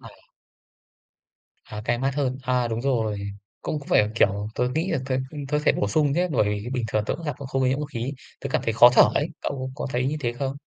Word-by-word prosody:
À. - - -11 1.6
À, 105 0 -7
cay 120 0 +1
mắt 135 +1 0
hơn. 130 -3 -1
À, 125 -1 +1
đúng 115 0 -2
rồi. 115 -6 0 0.4
Cũng 155 - -2
phải, 105 - +4
kiểu, 100 -2 +2
tớ 125 - +1
nghĩ 165 +5 0
là 165 - +1
t - - -10 0.4
tớ 150 - +1
thể - - +5
bổ 100 - -1
sung 145 +6 +2
nhé 180 +4 +1
bởi 110 -6 +3
vì 105 +2 -3
bình 125 -3 -1
thường 110 - +1
tớ - - 0
cũng 170 - -9
gặp 145 - -2
không 135 0 0
nhiễm 135 +2 +1
ô 150 - -2
khí. 120 0 -4 0.3
Tớ 140 - -4
cảm - - +1
thấy 115 - 0
khó 120 +3 +8
thở - - +8
ấy, 150 +3 +1
cậu 130 -2 -3
có 145 - -4
thấy 125 0 0
như 150 - -1
thế 120 -4 -1
không? 135 +2 -3
130 Hz, 240 wpm, -25 LUFS, 115-140 Hz, 1.6 s, khó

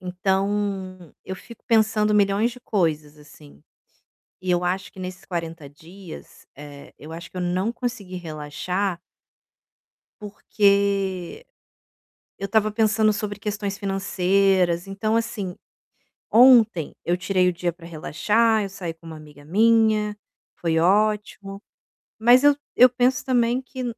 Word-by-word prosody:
Então, 190 -1 -2
eu 190 - -6
fico 235 +3 -14
pensando 215 -2 +2
milhões 205 +3 +2
de 245 - -12
coisas, 155 - -2
assim. 75 - -17 0.8
E 185 - -5
eu 175 0 +2
acho 185 +2 -2
que - - -14
nesses 185 +1 -8
40 165 -4 -6
dias, 170 +5 -13
eh, 145 -1 -12
eu 155 +2 -11
acho 165 +1 -9
que - - -10
eu - - -2
não 180 +5 -1
consegui 235 -6 -5
relaxar 175 +3 -4 1.2
porque 200 - 0 0.9
eu 195 - -3
estava 215 +1 +1
pensando 215 0 +2
sobre 205 -1 -4
questões 205 -1 -4
financeiras, 195 -2 +1
então, 215 +3 -1
assim, 215 -6 -3 0.7
ontem 225 - +5
eu 175 - +1
tirei 185 0 +1
o 180 - +1
dia 175 0 -2
pra 170 0 -14
relaxar, 210 +7 +1
eu 200 - -4
saí 185 -4 -6
com 165 0 -18
uma 160 - -8
amiga 150 -2 -15
minha, 215 +3 +2 0.4
foi 165 -1 0
ótimo. 200 +2 0 0.6
Mas 245 +4 +5
eu 290 0 +6 0.2
eu 250 - +8
penso 250 +1 +1
também 245 -1 +1
que 260 0 -7
195 Hz, 135 wpm, -23 LUFS, 175-215 Hz, 1.2 s, eu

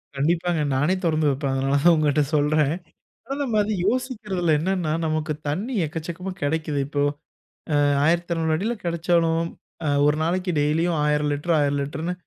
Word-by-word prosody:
கண்டிப்பாங்க, 165 +3 +1
நானே 145 +7 +2
தொறந்து 155 -2 +2
வைப்பேன். 140 0 -1
அதனால 135 +1 +1
தான் 175 0 +7
உங்கட்ட 150 -1 +2
சொல்றேன். 150 0 +2 0.6
ஆனா 270 - -3
நம்ம 235 -6 -1
அது 210 +1 -2
யோசிக்கிறதில்ல 210 - -1
என்னன்னா, 175 -1 -1
நமக்கு 155 0 -1 0.2
தண்ணீ 205 - -2
எக்கச்சக்கமா 170 +4 -5
கிடைக்குது. 150 0 -1
இப்போ, 145 0 -1 0.8
அ - - +3 0.2
1200 165 -1 +1
அடியில 215 +9 -1
கெடைச்சாலும் 165 -1 +1 0.6
1 150 +1 +3
நாளைக்கு 180 +3 0
டெய்லியும் 160 +3 +1
1000 150 0 +1
லிட்டர், 155 +4 -1
1000 145 -1 +1
லிட்டர்ன்னு 155 +5 -3
160 Hz, 140 wpm, -23 LUFS, 150-175 Hz, 0.8 s, தான்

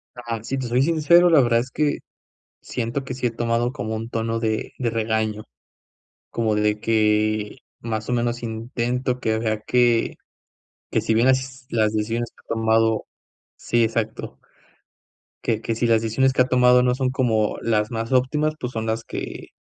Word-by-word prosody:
Ah, 115 -3 -5
si 135 +3 -3
te 130 -2 -3
soy 120 +2 +2
sincero, 170 +3 +5
la 160 -4 +6
verdad 120 -2 +3
es 125 +2 -4
que 150 +1 0 0.6
siento 120 +3 -3
que 130 - -5
sí 125 -1 -2
he - - +1
tomado 115 +1 -1
como 110 -3 -4
un 115 +1 -5
tono 115 0 -2
de 110 -1 -2
de 120 -3 0
regaño, 110 -1 -1 0.9
como 110 -2 0
de 105 0 +1
que 110 -1 +1 0.2
más 110 -2 -4
o - - -1
menos 120 0 -1
intento 120 +2 -2
que 110 -2 0
vea 110 -1 -1
que 120 0 +2 0.7
que - - +1
si 110 - 0
bien 115 +3 +3
las 130 0 0
las 110 -2 +2
decisiones 115 +2 -2
que - - -53
he - - -48
tomado 110 -1 +2 0.5
sí 120 0 +1
exacto. 110 -1 -3 1.0
Que 110 -2 0
que 115 - -2
si 115 - 0
las 115 -1 +3
decisiones 130 +4 +1
que 130 - +3
ha 125 - +3
tomado 125 0 +5
no 125 0 +2
son 130 -1 0
como 115 -5 +1
las 105 -2 0
más 115 +1 -3
óptimas, 150 +4 +1
pues 125 0 -5
son 110 -1 -3
las 110 0 -2
que - - -7
115 Hz, 180 wpm, -23 LUFS, 110-125 Hz, 1.0 s, la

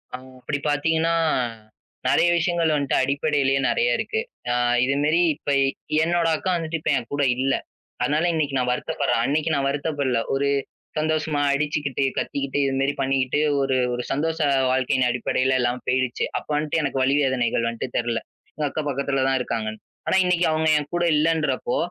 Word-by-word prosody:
அ - - -5 0.2
அப்படி 145 +3 -3
பார்த்தீங்கன்னா, 160 +3 +1 0.9
நெறைய - - +4
விஷயங்கள் 170 -1 +1
வந்துட்டு 140 -2 0
அடிப்படையிலயே 140 0 +1
நெறைய 475 +1 +2
இருக்கு. 445 - -2 0.3
அ - - +2 0.3
இது 135 +1 0
மாரி 155 +4 +3
இப்ப 145 - -4 0.5
என்னோட 170 0 +1
அக்கா 185 - -2
வந்துட்டு 165 0 -3
இப்ப - - 0
என் 120 - -6
கூட 145 0 +1
இல்ல. 135 +1 +1 0.5
அதனால 145 +6 +1
இன்னைக்கு 150 -4 -1
நான் 125 -1 0
வருத்தப்படுறேன். 140 -2 -1
அன்னைக்கு 150 +4 0
நான் 135 -1 0
வருத்தப்படல. 140 -3 -1
ஒரு 140 +1 +1 0.5
சந்தோஷமா 155 -1 0
அடிச்சிக்கிட்டு, 145 -2 -1
கத்திக்கிட்டு 140 0 -2
இது 135 - 0
மாரி 140 +1 +1
பண்ணிக்கிட்டு 135 0 +1 0.2
ஒரு 135 -1 +1 0.2
ஒரு 125 0 -3
சந்தோஷ 160 +3 -1 0.3
வாழ்க்கையின் 130 0 +1
அடிப்படையில 130 +2 +1
எல்லாம் 120 +1 -1
போயிடுச்சு. 130 -1 0
அப்ப - - -7
வந்துட்டு 150 +2 0
எனக்கு 140 -2 -1
வலி, 135 +2 +2
வேதனைகள் 120 -3 +1
வந்துட்டு 115 -1 -5
தெரியல. 120 -1 -1 0.3
எங்க 150 - -2
அக்கா 155 - -3
பக்கத்துல 140 0 -1
தான் 135 0 +2
இருக்காங்கன்னு. 110 -2 -3 0.3
ஆனா 190 - +3
இன்னைக்கு 180 -1 +2
அவங்க 160 0 +1
என் 145 -1 -4
கூட 175 - +1
இல்லன்றப்போ, 155 -6 0
140 Hz, 160 wpm, -23 LUFS, 130-155 Hz, 0.9 s, நெறைய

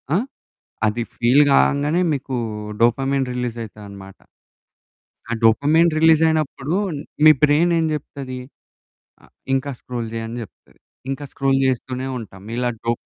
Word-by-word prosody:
ఆ? - - +4 0.7
అది 115 +3 -1
ఫీల్ 125 +5 +4
కంగానే 145 +5 +3
మీకూ 135 -2 -3 0.4
డోపమైన్ 135 +3 +2
రిలీజైతది 115 -4 -5
అన్నమాట. 95 -1 -12 1.1
ఆ - - -1
డోపమైన్ 150 +9 +4
రిలీజైనప్పుడు 160 -1 +2 0.5
మీ 155 - +10
బ్రైన్ 155 +4 +4
ఏం 160 - +1
చెప్తది? 135 -3 -7 0.8
ఆ - - -17 0.3
ఇంక 135 +1 -2
స్క్రోల్ 120 -2 -5
చెయ్యి 115 0 -4
అని 120 +2 -6
చెప్తది. - - -19 0.3
ఇంక 135 +2 -4
స్క్రోల్ 135 -1 +1
చేస్తూనే 130 +1 -2
ఉంటాం. 95 -4 -11
ఇలా 125 0 0 0.2
డో 115 - +2
130 Hz, 125 wpm, -21 LUFS, 120-145 Hz, 1.1 s, మీ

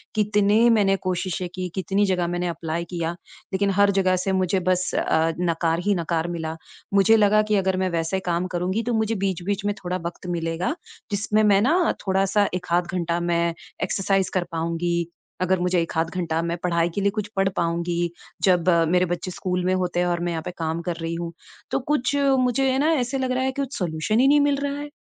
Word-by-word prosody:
कितने 210 +2 +3
मैंने 205 -4 +4
कोशिशें 185 0 -2
की, 185 -1 -3
कितनी 195 +2 +1
जगह 180 -3 0
मैंने 175 +1 -2
अप्लाई 170 0 -3
किया, 170 -1 -2 0.4
लेकिन 195 +1 +1
हर 200 0 +5
जगह 190 -1 +2
से 185 +2 -1
मुझे 190 0 +1
बस 185 0 0
अ, 160 +1 +1
नकार 165 -1 +1
ही 205 - +3
नकार 165 -1 -1
मिला। 165 -2 -4 0.4
मुझे 200 +3 +5
लगा 210 0 +4
कि 210 - +3
अगर 190 -1 +1
मैं 185 0 0
वैसे 165 +3 -1
काम 175 +1 0
करूँगी 180 +5 0
तो 240 +1 -1
मुझे 220 0 +1
बीच-बीच 195 +1 -2
में 205 - +1
थोड़ा 180 0 -2
वक्त 170 +1 -6
मिलेगा 170 - -2 0.4
जिसमें 205 +1 +1
मैं 200 -2 +5
न 345 +3 +3 0.2
थोड़ा-सा 195 +2 +2
1 180 0 -4
आध 175 0 +2
घंटा 170 -1 0
मैं 170 -1 +1 0.3
एक्सरसाइज 195 0 +1
कर 185 - +2
पाऊँगी, 170 +1 -1 0.3
अगर 185 0 +2
मुझे 180 0 +1
1 165 0 -4
आध 165 0 0
घंटा 165 -3 -1
मैं 170 0 -2
पढ़ाई 170 -1 +1
के 200 - 0
लिए 200 0 +2
कुछ 210 - -3
पढ़ 195 0 +3
पाऊँगी 170 0 0 0.3
जब 180 -2 +3 0.2
मेरे 180 +1 +3
बच्चे 175 +1 -5
स्कूल 180 0 -2
में 185 - +2
होते 180 -1 -1
हैं 180 - +2
और 175 -1 0
मैं 175 - -1
यहाँ 160 - -3
पे - - -3
काम 160 0 -2
कर 175 0 -3
रही 165 0 -3
हूँ। 170 0 -4 0.4
तो - - +1
कुछ 275 0 0
मुझे 270 -2 +2
है 260 - +1
ना, 305 +3 +3
ऐसे 260 -2 0
लग 260 -1 -1
रहा 255 +1 0
है 265 - +1
कि 280 - -3
कुछ 275 0 -4
सॉल्यूशन 175 +4 0
ही 265 - +5
नहीं 290 +1 +5
मिल 285 0 +3
रहा 285 0 -3
है। 290 0 -6
185 Hz, 215 wpm, -24 LUFS, 170-205 Hz, 0.4 s, हर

